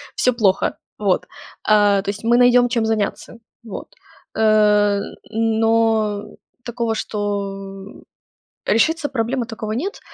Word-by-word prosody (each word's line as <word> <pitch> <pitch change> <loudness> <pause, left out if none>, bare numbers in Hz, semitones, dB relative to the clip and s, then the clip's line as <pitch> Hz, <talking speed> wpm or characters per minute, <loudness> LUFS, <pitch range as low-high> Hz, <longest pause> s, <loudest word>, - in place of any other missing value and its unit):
всё 250 - +2
плохо. 200 -5 +1 0.2
Вот. 200 -3 0 0.4
А, 205 -2 +4
то 195 - -5
есть 205 +1 -5
мы 235 +1 +3
найдем, 245 0 +5
чем 235 -2 0
заняться. 220 +1 -2 0.3
Вот. 220 -4 -8 0.5
Э, 210 -2 +4 0.3
но 225 -1 +1 0.4
такого, 235 -2 -2
что 200 -2 -5 0.6
решиться 305 +7 +2
проблемы 245 0 -1
такого 220 -1 -6
нет. 345 - -3
220 Hz, 110 wpm, -20 LUFS, 205-235 Hz, 0.6 s, найдем